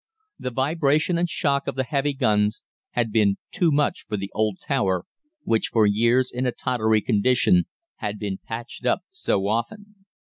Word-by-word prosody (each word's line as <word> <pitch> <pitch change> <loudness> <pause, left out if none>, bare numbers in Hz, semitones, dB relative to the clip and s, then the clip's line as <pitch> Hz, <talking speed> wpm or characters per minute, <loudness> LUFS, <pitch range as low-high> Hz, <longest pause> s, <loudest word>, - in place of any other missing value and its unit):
The - - -3
vibration 150 +5 +1
and 175 0 0
shock 140 -4 0
of - - -2
the 130 - 0
heavy 140 +2 0
guns 105 -5 +1 0.3
had 120 -2 0
been 105 -3 +3
too 180 -6 +2
much 145 0 0
for 105 - -2
the 100 0 -5
old 110 -3 0
tower, 95 -10 0 0.4
which, 110 - +1
for 110 -2 +3
years 115 +5 +3
in 125 +1 -1
a - - +1
tottery 110 -4 +1
condition, 125 - +3 0.3
had 105 -2 -4
been 100 -2 -4
patched 115 +2 -7
up 125 - +1
so 100 - -1
often. 195 - -4
120 Hz, 170 wpm, -24 LUFS, 105-140 Hz, 0.4 s, been